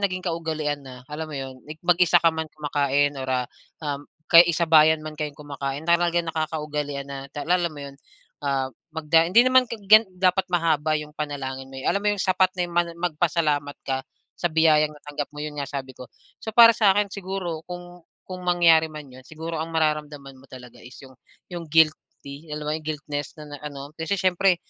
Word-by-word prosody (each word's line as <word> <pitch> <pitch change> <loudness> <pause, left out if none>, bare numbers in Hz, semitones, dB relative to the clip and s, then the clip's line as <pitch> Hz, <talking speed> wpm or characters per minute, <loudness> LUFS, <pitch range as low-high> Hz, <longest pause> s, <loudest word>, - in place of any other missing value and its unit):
naging 185 0 -5
kaugalian 160 -4 -2
na, 130 -2 -12
alam 155 +3 -6
mo 150 - -6
'yon, 130 -1 -7
like 155 - -7
mag-isa 175 0 +4
ka 165 -1 +4
man 160 0 -4
kumakain 145 -1 0
or, 130 - -5
ah, 125 -1 0 0.4
um, 145 0 -4 0.2
kaya 165 +2 +8
eh, 170 - 0
sabayan 160 -2 +4
man 155 - -6
kayong 150 -2 -4
kumakain 140 0 -5
talaga 170 0 +2
nakakaugalian 150 -3 -3
na 140 0 -8
tal 145 - -6
alam 175 -1 +2
mo 145 -3 -9
'yon, 140 - -9 0.5
ah, 135 -2 -1 0.2
magda 160 +1 +2
hindi 230 +7 +6
naman 255 -1 +4
tig 215 -4 -8
gan 215 +1 +7
dapat 185 +1 +1
mahaba 160 -3 +1
yung 150 0 -7
panalangin 135 -3 -5
mo 135 - -11
eh, 130 - -7
alam 200 - +1
mo 210 - 0
yung - - -4
sapat 185 0 +3
na 180 - 0
yung 175 - -8
man 175 0 +2
magpasalamat 155 -4 0
ka 130 -1 -1 0.3
sa 175 - -2
biyayang 155 -2 +3
natanggap 145 0 -6
mo, 150 0 -7
'yon 150 -1 -5
nga 140 - -4
sabi 135 -2 -6
ko. 125 0 -12 0.3
So, - - -9
para 230 -1 +10
sa 205 -4 +3
akin, 205 -1 0
siguro 185 -4 -4
kung 175 0 -9 0.2
kung 185 -1 -8
mangyari 165 -2 +5
man 155 -1 -9
'yon, 130 - -12
siguro 160 0 -5
ang 160 - -3
mararamdaman 150 -4 -2
mo 135 - -20
talaga 125 -2 -13
is, 125 +2 -13
yung 130 - -14 0.4
yung 170 -2 -6
guilty, 155 -1 0
alam 150 0 -5
mo 150 - -1
'yon, 155 - -3
guiltness 145 -1 -5
ng, 150 -1 -11
ah, 145 - -9
ano. 140 +1 -9
Kasi, 160 +5 -1
siyempre 185 0 +2
155 Hz, 205 wpm, -24 LUFS, 145-175 Hz, 0.5 s, para